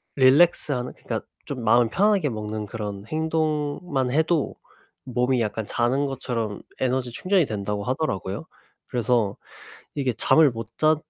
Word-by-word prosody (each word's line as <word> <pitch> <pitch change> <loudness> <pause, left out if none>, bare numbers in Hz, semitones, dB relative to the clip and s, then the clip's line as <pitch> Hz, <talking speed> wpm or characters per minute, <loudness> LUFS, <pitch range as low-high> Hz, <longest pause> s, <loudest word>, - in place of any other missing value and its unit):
릴렉스하는 135 -2 +4
그니까 - - -4 0.2
좀 130 -4 -5
마음을 115 +1 +4
편하게 195 - +3
먹는 110 -1 -4
그런 105 -2 -5
행동만 155 -3 -1
해도 160 +1 +1 0.5
몸이 125 0 +1
약간 110 0 -2
자는 130 +6 +1
것처럼 120 -6 -3 0.2
에너지 130 -1 0
충전이 185 +6 +2
된다고 105 -2 -3
하더라고요. 125 - -2 0.5
그래서 120 -4 +1 0.6
이게 135 -4 0
잠을 155 +6 +5
못 115 -1 -7
잤 155 0 +4
130 Hz, 305 characters per minute, -24 LUFS, 115-150 Hz, 0.6 s, 잠을